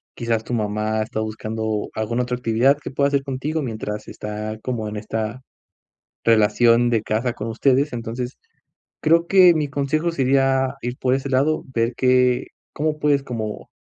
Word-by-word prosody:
Quizás 115 -2 -1
tu 120 - -5
mamá, 110 0 -1
está 110 0 -5
buscando 110 0 -3
alguna 115 +3 -1
otra 125 0 -2
actividad 125 +3 +3
que - - -5
pueda 140 +1 +1
hacer 140 -1 +1
contigo, 140 +4 -3
mientras 110 -4 -5
está, 105 +1 -5
como 115 -4 -3
en 105 - -6
esta 110 +3 -4 0.8
relación, 115 +2 +4
de 115 -3 +1
casa 115 +3 -1
con 105 - -5
ustedes. 135 +5 +2
Entonces, 120 +1 -5 0.7
creo 170 +2 +3
que 185 -2 +7
mi 150 -2 0
consejo 145 +4 0
sería 135 -1 +2
ir 120 +1 -4
por 130 -1 +1
ese 135 +1 -3
lado. 140 +4 +1
Ver 115 +1 +1
qué 125 -1 +3 0.3
cómo 150 0 -1
puedes, 145 -2 +2
como 110 -5 -5
125 Hz, 160 wpm, -22 LUFS, 110-135 Hz, 0.8 s, que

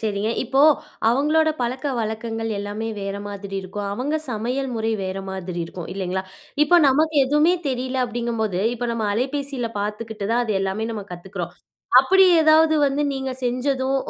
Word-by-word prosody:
செரிங்க. 210 0 -1
இப்போ 265 +3 +1 0.5
அவங்களோட 305 +5 +3
பழக்க 255 +3 -2
வழக்கங்கள் 225 +1 -3
எல்லாமே 205 +2 -4
வேற 195 0 -3
மாதிரி 200 -1 -7
இருக்கும். 200 +2 -5
அவங்க 275 +8 -1
சமையல் 250 +5 -2
முறை 225 0 -1
வேற 190 +1 -3
மாதிரி 180 -2 -5
இருக்கும். 170 0 -8
இல்லைங்களா? 190 -1 -2 0.4
இப்போ 325 +4 +5
நமக்கு 310 +3 +2
எதுமே 300 +5 +3 0.2
தெரியல 260 0 -2
அப்படிங்கும்போது, 230 -5 -2
இப்ப 245 +1 -3
நம்ம 220 -2 -1
அலைபேசியில 265 0 -2
பார்த்துக்கிட்டு 210 0 -4
தான் 245 +1 +2
அது 220 - -1
எல்லாமே 195 +3 -2
நம்ம 205 -3 -5
கத்துக்கிறோம். 180 +3 -6 0.5
அப்படி 385 0 +5 0.2
ஏதாவது 315 0 +5
வந்து 280 +2 0
நீங்க 265 -1 -3
செஞ்சதும், 260 +2 0
230 Hz, 150 wpm, -22 LUFS, 205-270 Hz, 0.5 s, இப்போ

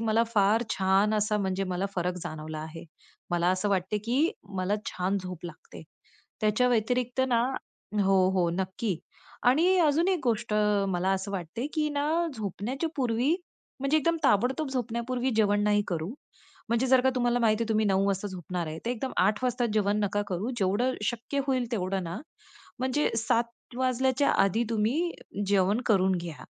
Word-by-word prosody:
मला 225 +1 +2
फार 210 +3 +4
छान 195 +3 +2
असा 210 0 +1
म्हणजे 195 -1 -1
मला 185 +1 -2
फरक 180 0 -1
जाणवला 155 0 -6
आहे. 160 +1 -8 0.5
मला 175 0 +2
असं 185 +2 0
वाटते, 195 +2 0
की 250 - +1 0.3
मला 185 +3 0
छान 190 +2 -1
झोप 180 -2 -7
लागते. 165 -1 -11 0.6
त्याच्या 215 +4 +3
व्यतिरिक्त 245 +2 +1
ना 235 -1 +3 0.6
हो, 190 -1 +4
हो, 180 -3 +1
नक्की. 190 +1 -2 0.5
आणि 340 +9 +4
अजून 320 +2 +3
एक 370 - +1
गोष्ट 230 -2 0 0.4
मला 180 +1 0
असं 195 +1 -3
वाटते 195 - -4
की 305 -1 +1
ना, 290 0 -1 0.3
झोपण्याच्या 225 - -3
पूर्वी 255 +5 +2 0.5
म्हणजे 275 +3 +3
एकदम 335 +2 +1
ताबडतोब 260 +8 +2
झोपण्यापूर्वी 245 0 -2
जेवण 205 -1 +3
नाही 205 0 +3
करू. 165 -3 -2 0.6
म्हणजे 235 +3 +2
जर 255 -1 +5
का 265 - +3
तुम्हाला 245 -1 +2
माहिती 225 -1 +2
आहे 230 - -7
तुम्ही 220 -1 +2
9 195 0 +2
वाजता 195 +1 -1
झोपणार 180 -2 -4
आहे, 160 +1 -5
तर - - 0
एकदम 250 +2 -3
8 210 +6 +2
वाजता 245 -1 +1
जेवण 205 -1 +2
नका 205 +1 0
करू. 190 +6 -2
जेवढं 210 +6 +1
शक्य 240 +5 -2
होईल 255 -3 +1
तेवढं 190 -3 -1
ना, 170 +3 -5 0.6
म्हणजे 260 +3 +1
7 235 +2 -1
वाजल्याच्या 260 +2 +2
आधी 200 +4 +2
तुम्ही 235 +11 +1 0.4
जेवण 200 +3 +2
करून 190 -3 +3
घ्या. 170 -3 -7
215 Hz, 165 wpm, -28 LUFS, 190-250 Hz, 0.6 s, जर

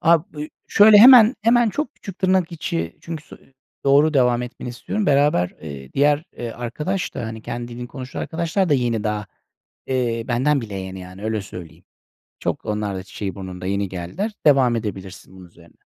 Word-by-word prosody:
Ab 165 0 +4
ııı, 150 +1 -5 0.2
şöyle, 210 0 +7
hemen 245 +1 +9
hemen 235 0 +4
çok 295 +2 -3
küçük 195 -1 -10
tırnak 185 -2 +1
içi 85 - -4
çünkü 165 -2 -7
so - - -13 0.5
doğru 145 +3 +4
devam 125 -2 +3
etmeni 125 0 -7
istiyorum. 205 - -3
Beraber, 140 -11 +3
eee, 70 -4 -9
diğer, 145 +3 +2
eee, 120 -1 -5
arkadaş 150 +12 -4
da, 115 - -4
hani, 110 0 -7
kendi 120 0 -5
dilini 120 +1 -7
konuşan 130 -1 -7
arkadaşlar 170 +3 -1
da 145 - +4
yeni 120 -4 0
daha, 105 -1 -2 0.6
eee, 120 -3 -1
benden 135 +4 +2
bile 105 -4 -7
yeni, 95 0 -6
yani, 95 +3 -10
öyle 110 -1 -1
söyleyeyim. 90 -4 -11 0.6
Çok - - -3
onlar 105 -2 -2
da 95 - -5
çiçeği 95 0 -6
burnunda, 95 -2 -7
yeni 100 +1 -1
geldiler. 95 - -4
Devam 130 -5 +5
edebilirsin, 95 -3 -7
bunun 90 -1 -12
üzerine. 85 0 -20
120 Hz, 180 wpm, -21 LUFS, 100-155 Hz, 0.6 s, hemen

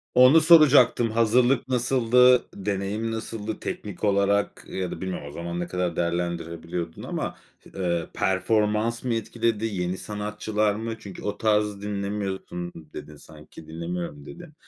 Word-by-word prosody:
Onu 130 +6 +7
soracaktım, 145 -8 +6
hazırlık 120 +3 +3
nasıldı, 125 0 +4
deneyim 100 +3 -2
nasıldı, 110 -1 -5
teknik 105 -2 -6
olarak 100 0 +1
ya 95 -1 -4
da - - -7
bilmiyorum 95 -6 -4
o - - -10
zaman 85 +2 -5
ne 90 - -3
kadar 90 -2 -2
değerlendirebiliyordun 85 -1 -3
ama, - - -4 0.4
ııı, 85 -3 -1
performans 105 +4 +1
mı 125 - 0
etkiledi? 115 0 -1
Yeni 90 -3 -2
sanatçılar 105 0 -2
mı? 115 +1 -4
Çünkü 100 -4 -10
o 105 - -3
tarz 105 -2 +1
dinlemiyorsun, 100 -3 -4 0.2
dedin 75 - -9
sanki, 75 +1 -14
"Dinlemiyorum." 85 -2 -5
dedin. 175 - -11
105 Hz, 130 wpm, -25 LUFS, 90-115 Hz, 0.4 s, Onu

